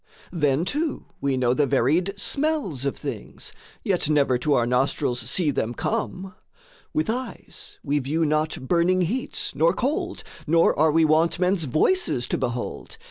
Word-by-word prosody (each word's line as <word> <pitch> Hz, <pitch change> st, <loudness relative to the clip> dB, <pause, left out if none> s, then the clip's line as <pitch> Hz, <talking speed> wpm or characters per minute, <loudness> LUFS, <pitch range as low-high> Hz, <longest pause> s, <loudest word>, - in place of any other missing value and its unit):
Then 150 Hz, -1 st, +1 dB
too 305 Hz, -, -2 dB, 0.2 s
we 140 Hz, -2 st, 0 dB
know 125 Hz, -1 st, +2 dB
the 140 Hz, +2 st, +2 dB
varied 170 Hz, -, +1 dB
smells 275 Hz, -, 0 dB
of 140 Hz, -, -1 dB
things -, -, -7 dB, 0.3 s
Yet 185 Hz, -, 0 dB
never 140 Hz, -4 st, +2 dB
to 145 Hz, +4 st, +1 dB
our 120 Hz, -, +2 dB
nostrils 125 Hz, +1 st, 0 dB
see 170 Hz, -6 st, +1 dB
them 120 Hz, -3 st, -2 dB
come; 195 Hz, -4 st, -3 dB, 0.6 s
With 310 Hz, -3 st, 0 dB
eyes 245 Hz, +2 st, -6 dB
we 145 Hz, 0 st, 0 dB
view 155 Hz, +5 st, 0 dB
not 155 Hz, -3 st, -1 dB
burning 175 Hz, +3 st, +2 dB
heats, 230 Hz, +10 st, -2 dB
nor 160 Hz, +5 st, +3 dB
cold, 345 Hz, -, -2 dB, 0.2 s
Nor 165 Hz, +2 st, +4 dB
are 155 Hz, +1 st, +3 dB
we 160 Hz, +1 st, +4 dB
wont 160 Hz, +2 st, +3 dB
men's 180 Hz, -2 st, +1 dB
voices 155 Hz, -, +1 dB
to -, -, 0 dB
behold. 120 Hz, 0 st, -4 dB
160 Hz, 155 wpm, -24 LUFS, 140-195 Hz, 0.6 s, Nor